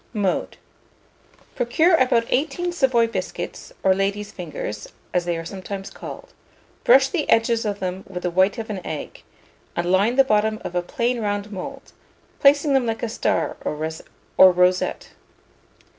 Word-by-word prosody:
Mode. 200 -4 -1 1.0
Procure 270 +8 +2
about 250 -6 +3
18 340 +6 0
Savoy 260 -8 +3
biscuits, 230 - -5
or 190 - +5
ladies' 200 +2 -2
fingers, 150 - -6 0.3
as 180 -1 +1
they 175 -1 -1
are 165 - -6
sometimes 195 +1 -6
called; - - -10 0.5
brush 265 +2 +6
the 305 0 -2
edges 230 0 +3
of 205 -1 -1
them 185 0 -4
with 180 -2 -7
the 180 - -1
white 190 +3 +3
of 220 -1 -5
an 190 -3 -5
egg, 155 - -6 0.5
and 175 +1 -1
line 200 +6 +3
the 270 - +6
bottom 215 -3 +1
of - - -5
a 180 - +1
plain 235 +7 -1
round 205 0 -2
mould, 190 -3 -8 0.5
placing 285 +1 +4
them 265 -3 +2
like 225 0 -3
a 235 - -1
star 225 - -1
or - - -2 0.8
rosette. 180 +1 +1
210 Hz, 155 wpm, -22 LUFS, 185-245 Hz, 1.0 s, brush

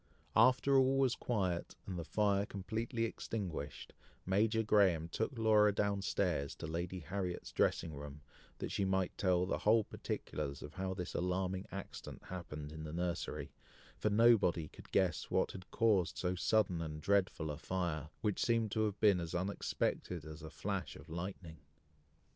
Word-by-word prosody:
After 130 +4 +5
all 135 +1 +4
was 135 -3 +4
quiet, 95 -9 -1
and 90 -2 -4
the - - -3
fire 100 +3 +1
completely 115 +4 -2
extinguished, 95 -10 -5 0.3
Major 110 +4 +2
Graham 95 -7 +4
took 110 +8 -2
Laura 105 -2 +5
down 100 0 0
stairs 85 -8 0
to - - -7
Lady 85 +3 -3
Harriet's 90 +3 -4
dressing 80 - +1
room, 75 0 -8 0.4
that - - -4
she 100 - 0
might 95 -1 +1
tell 90 -2 +2
the - - -1
whole 110 +1 +4
particulars 70 -7 -4
of 75 - -8
how 95 0 -3
this 90 -2 -4
alarming 95 +1 -1
accident 100 - -7
happened 75 -5 -6
in 80 0 -7
the 75 0 -6
nursery, 85 0 -2 0.5
for 105 - +2
nobody 105 -7 +4
could - - -14
guess 90 -4 +1
what - - +2
had 95 -1 -10
caused 105 -6 +2
so 90 0 0
sudden 95 -2 +2
and 75 -1 -4
dreadful 90 -5 +1
a 75 - -5
fire, 85 -5 -2
which 105 -3 0
seemed 115 -3 +2
to 110 0 +2
have 105 -1 -3
been 100 -4 +5
as 85 0 -4
unexpected 90 -3 -1
as 80 +1 -8
a 80 - -7
flash - - -3
of - - -13
lightning. 85 -1 -6
95 Hz, 165 wpm, -36 LUFS, 85-105 Hz, 0.5 s, After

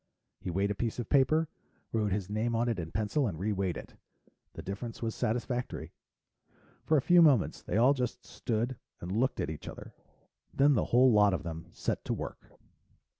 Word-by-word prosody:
He - - -5
weighed 100 +4 0
a - - +1
piece 115 +2 -2
of 120 - -4
paper, 155 +4 +4 0.5
wrote 105 -3 +1
his 95 -1 -1
name 110 +3 -1
on 115 +2 +1
it 115 -5 0
in 80 -1 -5
pencil 110 +6 0
and 85 -6 -4
reweighed 95 -1 -1
it. - - -11 0.6
The - - -8
difference 110 +5 -6
was 115 -1 -1
satisfactory. 125 +2 -2 0.9
For 155 - +3
a 135 - +1
few 175 -1 +6
moments, 140 - +4
they - - -2
all 125 +5 +6
just 125 -2 -3
stood 120 +2 -2 0.2
and 90 - -6
looked 120 +7 +1
at - - -1
each 80 - -8
other. - - -9 0.6
Then 145 +1 +4
the 120 - +2
whole 125 +2 +5
lot 105 -3 +5
of 75 - -5
them 80 0 -6
set - - -3
to - - -1
work. - - -7
115 Hz, 190 wpm, -31 LUFS, 100-125 Hz, 0.9 s, few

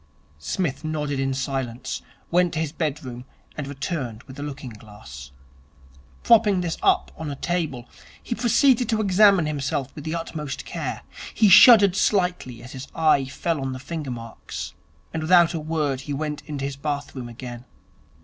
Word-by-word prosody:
Psmith 150 - -2
nodded 150 -3 -2
in 135 0 0
silence, 130 -2 -3 0.3
went 175 0 +3
to 160 - -2
his 160 -3 -1
bedroom, 135 -6 -4 0.3
and 145 -2 -5
returned 140 -5 -4
with 135 +1 -12
a - - -4
looking 145 -3 -6
glass. 105 - -12 0.9
Propping 215 -5 +5
this 170 -2 -2
up - - +2
on 160 -2 -5
a 140 - -4
table, 155 -7 -2 0.4
he - - -3
proceeded 245 +1 +3
to 220 -2 +1
examine 200 -3 +5
himself 140 -3 -2
with 150 - -9
the 160 +1 -3
utmost 155 -5 -5
care. - - -4 0.3
He 215 -2 +5
shuddered 205 -1 +9
slightly 180 - 0
as 125 - -10
his 130 +1 -8
eye 155 -4 +3
fell 145 +3 -2
on 135 -1 -3
the - - -5
finger 150 +2 -5
marks; 115 -2 -7 0.4
and 165 - -2
without 175 +1 +5
a 165 - -2
word 150 -4 -1
he 145 +1 -5
went 150 +1 -3
into 145 -3 -4
his 140 -1 -4
bathroom 140 -4 -4
again. 120 0 -8
150 Hz, 165 wpm, -24 LUFS, 130-175 Hz, 0.9 s, shuddered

